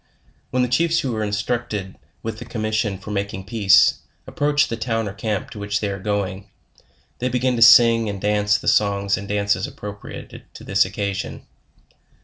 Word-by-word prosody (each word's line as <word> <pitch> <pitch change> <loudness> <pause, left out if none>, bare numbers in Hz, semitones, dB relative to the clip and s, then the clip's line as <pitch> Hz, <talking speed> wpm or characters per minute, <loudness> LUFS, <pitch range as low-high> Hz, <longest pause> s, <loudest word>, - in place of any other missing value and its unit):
When 125 +1 +1
the - - +1
chiefs 165 +7 +2
who 125 -4 -2
are 110 - -2
instructed 105 -1 -3 0.3
with 110 -1 -5
the 120 - -8
commission 110 -2 -1
LEWIS - - -6
AND 95 - -13
CLARKE. 105 - -6
91 - - -3
for 100 +1 -2
making 95 0 -8
peace, 100 -2 +5 0.3
approach 145 0 +1
the 115 - -3
town 115 -1 -2
or 100 - -5
camp 105 -1 -3
to 105 - -8
which 100 0 -2
they 105 - -2
are 100 - -5
going, 100 -1 -3 0.7
they 125 - -1
begin 125 +1 0
to 115 - -2
sing 115 -1 +7
and 100 -1 -5
dance 105 +1 +2
the - - -9
songs 100 -1 +2
and 100 - -7
dan 100 0 -1
ces 95 -2 +1
appropriated 105 0 -9
to - - -10
this 100 0 +2
occasion. 100 0 -4
105 Hz, 200 wpm, -21 LUFS, 100-115 Hz, 0.7 s, sing